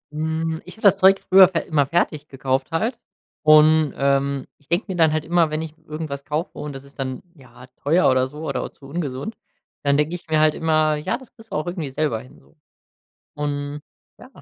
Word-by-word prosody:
Mhm, 160 Hz, +1 st, -2 dB
ich 180 Hz, -, -11 dB
habe -, -, -17 dB
das 200 Hz, -1 st, +6 dB
Zeug 195 Hz, +1 st, +6 dB
früher 190 Hz, 0 st, +9 dB
fer 175 Hz, -2 st, -2 dB
immer 145 Hz, -3 st, +2 dB
fertig 155 Hz, -2 st, 0 dB
gekauft 135 Hz, 0 st, -2 dB
halt 225 Hz, +9 st, -1 dB, 0.5 s
und, 155 Hz, 0 st, +6 dB
ähm, 140 Hz, 0 st, +1 dB
ich 145 Hz, -, -28 dB
denke 175 Hz, +5 st, +1 dB
mir 190 Hz, -, -2 dB
dann 160 Hz, -3 st, +4 dB
halt 155 Hz, 0 st, -1 dB
immer, 170 Hz, -1 st, +3 dB
wenn 155 Hz, +1 st, -2 dB
ich 155 Hz, -, -7 dB
irgendwas 150 Hz, -2 st, -5 dB
kaufe 155 Hz, +3 st, -3 dB
und 150 Hz, -1 st, -5 dB
das 135 Hz, 0 st, -9 dB
ist 140 Hz, 0 st, -19 dB
dann, 130 Hz, -1 st, -3 dB
ja, 125 Hz, -3 st, -15 dB, 0.2 s
teuer 165 Hz, +6 st, +3 dB
oder 130 Hz, 0 st, +2 dB
so 150 Hz, +4 st, -8 dB
oder 140 Hz, -, -2 dB
auch -, -, -5 dB
zu 140 Hz, -, -18 dB
ungesund, 145 Hz, -, -4 dB, 0.5 s
dann 140 Hz, 0 st, +3 dB
denke 150 Hz, +3 st, 0 dB
ich 175 Hz, -, -10 dB
mir 155 Hz, -1 st, +3 dB
halt 155 Hz, 0 st, +4 dB
immer: 155 Hz, -1 st, +2 dB
„Ja, 155 Hz, +8 st, -2 dB
das 260 Hz, -3 st, -17 dB
kriegst 225 Hz, -2 st, -18 dB
du -, -, -3 dB
auch 150 Hz, -, -1 dB
irgendwie 175 Hz, -5 st, -4 dB
selber 135 Hz, -5 st, -1 dB
hin.“ 130 Hz, -, -17 dB
so. -, -, -26 dB, 0.8 s
Und, 145 Hz, 0 st, -3 dB, 0.4 s
ja -, -, -13 dB
155 Hz, 215 wpm, -22 LUFS, 140-165 Hz, 0.8 s, früher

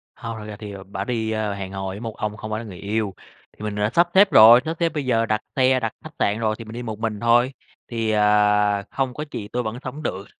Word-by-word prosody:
Hông, 115 Hz, 0 st, -6 dB
thật 105 Hz, -, -8 dB
ra 105 Hz, -, -7 dB
thì, 105 Hz, -1 st, -8 dB
ờ, 100 Hz, -1 st, -9 dB
bả 100 Hz, -, -5 dB
đi 110 Hz, -3 st, -2 dB
hẹn 100 Hz, -3 st, -3 dB
hò 95 Hz, 0 st, -4 dB
với 95 Hz, +2 st, -5 dB
một 115 Hz, -2 st, -6 dB
ông 105 Hz, 0 st, -3 dB
không 110 Hz, 0 st, -7 dB
phải 110 Hz, -, -1 dB
là 115 Hz, -, -7 dB
người 95 Hz, -5 st, -9 dB
yêu. 105 Hz, 0 st, -2 dB, 0.4 s
Thì -, -, -10 dB
mình 105 Hz, -1 st, -3 dB
đã 105 Hz, 0 st, +1 dB
sắp 170 Hz, +1 st, +4 dB
xếp 195 Hz, 0 st, +6 dB
rồi, 115 Hz, +2 st, +9 dB
sắp 160 Hz, +1 st, -3 dB
xếp 170 Hz, -1 st, +2 dB
bây 150 Hz, -4 st, -4 dB
giờ 115 Hz, -3 st, +2 dB
đặt 110 Hz, -1 st, 0 dB
xe, 130 Hz, -1 st, +4 dB
đặt 115 Hz, -3 st, -3 dB
khách -, -, -10 dB
sạn 105 Hz, +2 st, +1 dB
rồi 110 Hz, -1 st, 0 dB
thì 115 Hz, -, -7 dB
mình 110 Hz, -, -9 dB
đi 120 Hz, +1 st, -5 dB
một 110 Hz, -2 st, -5 dB
mình 110 Hz, -2 st, -2 dB
thôi, 120 Hz, +3 st, +3 dB, 0.4 s
thì, 115 Hz, -2 st, -1 dB
ờ, 105 Hz, -1 st, +3 dB
không 135 Hz, -2 st, -1 dB
có 150 Hz, -, -5 dB
chị 105 Hz, -, -5 dB
tôi 125 Hz, -, 0 dB
vẫn 110 Hz, +1 st, -4 dB
sống 140 Hz, +4 st, -6 dB
được. 100 Hz, -8 st, -4 dB
110 Hz, 275 wpm, -23 LUFS, 105-120 Hz, 0.4 s, rồi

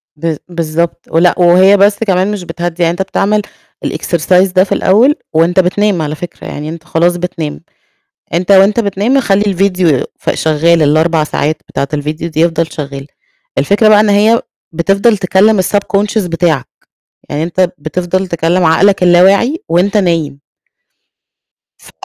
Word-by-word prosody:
ب 160 Hz, +1 st, -3 dB
بالضبط. 170 Hz, 0 st, -3 dB
ولأ، 170 Hz, +2 st, +3 dB
وهي 185 Hz, +3 st, +5 dB
بس 200 Hz, +1 st, +3 dB
كمان 190 Hz, +1 st, +1 dB
مش 205 Hz, -3 st, -5 dB
بتهدِّي، 175 Hz, 0 st, -4 dB
يعني 165 Hz, -, +2 dB
أنت 175 Hz, +3 st, -4 dB
بتعمل 200 Hz, +2 st, 0 dB, 0.4 s
الexercise 180 Hz, +2 st, 0 dB
ده 185 Hz, -, +5 dB
في 195 Hz, -, -9 dB
الأول، 235 Hz, +10 st, +3 dB, 0.2 s
وأنت 165 Hz, +3 st, +2 dB
بتنام 185 Hz, 0 st, +1 dB
على 150 Hz, 0 st, -3 dB
فكرة، 175 Hz, +2 st, -9 dB
يعني 150 Hz, +1 st, -6 dB
أنت 165 Hz, 0 st, -8 dB
خلاص 170 Hz, +3 st, 0 dB
بتنام. 165 Hz, -4 st, -5 dB, 0.7 s
أنت 180 Hz, +3 st, 0 dB
وأنت 195 Hz, +3 st, +4 dB
بتنام 215 Hz, +5 st, 0 dB
خلّي 200 Hz, -6 st, +1 dB
الفيديو 185 Hz, -6 st, +1 dB, 0.2 s
ف -, -, -3 dB
شغال، 160 Hz, +2 st, +1 dB
ال4 155 Hz, +2 st, +2 dB
ساعات 150 Hz, 0 st, -2 dB
بتاعة 140 Hz, -, -3 dB
الفيديو 150 Hz, +3 st, -4 dB
دي 155 Hz, -, -5 dB
يفضل 165 Hz, -1 st, 0 dB
شغال. 140 Hz, -2 st, -7 dB, 0.5 s
الفكرة 210 Hz, +2 st, +2 dB
بقى 210 Hz, -1 st, +6 dB
إن 210 Hz, 0 st, +2 dB
هي 215 Hz, +3 st, +3 dB, 0.3 s
بتفضل 195 Hz, +7 st, +1 dB
تكلم 195 Hz, +2 st, +2 dB
الSubconscious 200 Hz, +1 st, -1 dB
بتاعك، 165 Hz, -5 st, -1 dB, 0.6 s
يعني 150 Hz, +2 st, -2 dB
أنت 175 Hz, +2 st, 0 dB
بتفضل 180 Hz, +5 st, -3 dB
تكلم 170 Hz, +1 st, 0 dB
عقلك 190 Hz, +4 st, +3 dB
اللا 175 Hz, 0 st, +5 dB
واعي 235 Hz, -, +2 dB
وأنت 190 Hz, +5 st, +1 dB
نايم. 165 Hz, -7 st, -1 dB, 1.4 s
ف -, -, -17 dB
175 Hz, 150 wpm, -12 LUFS, 165-200 Hz, 1.4 s, بقى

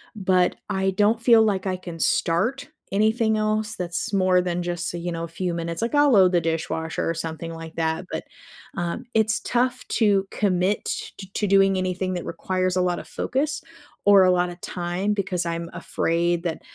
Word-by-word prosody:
but 185 Hz, -3 st, +2 dB
I 190 Hz, 0 st, +1 dB
don't 210 Hz, +4 st, +2 dB
feel 230 Hz, -2 st, +6 dB
like 195 Hz, -3 st, 0 dB
I 185 Hz, -1 st, -1 dB
can 175 Hz, -2 st, -9 dB
start 225 Hz, -, +1 dB, 0.2 s
anything 220 Hz, +2 st, +2 dB
else 215 Hz, +1 st, 0 dB
that's 175 Hz, +2 st, -3 dB
more 185 Hz, -2 st, +3 dB
than 180 Hz, -1 st, -2 dB
just, 175 Hz, -1 st, -3 dB
uh, -, -, -3 dB
you 175 Hz, +1 st, -4 dB
know, 165 Hz, 0 st, -4 dB
a -, -, -4 dB
few 175 Hz, +1 st, -3 dB
minutes, 170 Hz, +2 st, -4 dB
like, 235 Hz, +5 st, -1 dB
I'll 290 Hz, -1 st, +5 dB
load 190 Hz, -4 st, +6 dB
the 175 Hz, -, +2 dB
dishwasher 160 Hz, 0 st, -2 dB
or -, -, +1 dB
something 165 Hz, 0 st, -5 dB
like 165 Hz, 0 st, -9 dB
that, 160 Hz, +2 st, -1 dB
but, -, -, -3 dB, 0.5 s
um, 175 Hz, +8 st, -3 dB
it's 220 Hz, 0 st, +3 dB
tough 250 Hz, +1 st, 0 dB
to 200 Hz, -3 st, +2 dB
commit 190 Hz, 0 st, 0 dB
t -, -, -4 dB
t 190 Hz, -1 st, -9 dB
to 210 Hz, -, 0 dB
doing 195 Hz, -1 st, +4 dB
anything 185 Hz, 0 st, -1 dB
that 175 Hz, -2 st, -4 dB
requires 185 Hz, +1 st, -1 dB
a 185 Hz, -, +2 dB
lotta 180 Hz, -1 st, -1 dB
focus 285 Hz, +3 st, -2 dB, 0.4 s
or 200 Hz, -2 st, +7 dB
a 185 Hz, -, +5 dB
lotta 175 Hz, -1 st, 0 dB
time 180 Hz, +3 st, -2 dB
because 185 Hz, -3 st, -1 dB
I'm 170 Hz, 0 st, -3 dB
afraid 170 Hz, +1 st, 0 dB
that, 165 Hz, -2 st, -3 dB
185 Hz, 190 wpm, -24 LUFS, 170-210 Hz, 0.5 s, or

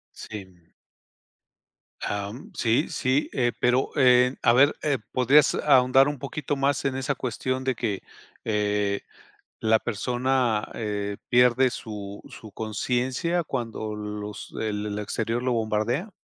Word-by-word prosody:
Sí. 95 Hz, -5 st, -10 dB, 1.4 s
Am, 100 Hz, +5 st, -4 dB
sí 120 Hz, +6 st, +1 dB
sí, 140 Hz, -2 st, 0 dB
eh, 120 Hz, -2 st, +1 dB
pero, 125 Hz, +2 st, +2 dB
eh, 125 Hz, -1 st, +5 dB
a 115 Hz, -, +5 dB
ver, 140 Hz, +4 st, +5 dB
eh, 145 Hz, -3 st, +1 dB
¿podrías 140 Hz, +4 st, +4 dB
ahondar 135 Hz, -1 st, +5 dB
un 145 Hz, -2 st, -3 dB
poquito 145 Hz, +2 st, -3 dB
más 140 Hz, 0 st, +1 dB
en 135 Hz, -1 st, 0 dB
esa 135 Hz, +1 st, -1 dB
cuestión 130 Hz, +2 st, -3 dB
de 130 Hz, 0 st, +1 dB
que, 110 Hz, -4 st, -3 dB, 0.4 s
eh, 105 Hz, -2 st, 0 dB, 0.6 s
la 110 Hz, 0 st, +4 dB
persona, 120 Hz, 0 st, 0 dB
eh, 105 Hz, -2 st, -3 dB
pierde 125 Hz, +1 st, +5 dB
su 100 Hz, -4 st, -7 dB
su 110 Hz, -, -11 dB
conciencia 125 Hz, +9 st, -1 dB
cuando 115 Hz, -6 st, -4 dB
los 105 Hz, 0 st, -6 dB
el 105 Hz, -1 st, -2 dB
el 105 Hz, 0 st, -3 dB
exterior 115 Hz, +3 st, -2 dB
lo 125 Hz, 0 st, 0 dB
bombardea? 115 Hz, -, -1 dB
120 Hz, 130 wpm, -25 LUFS, 105-130 Hz, 1.4 s, eh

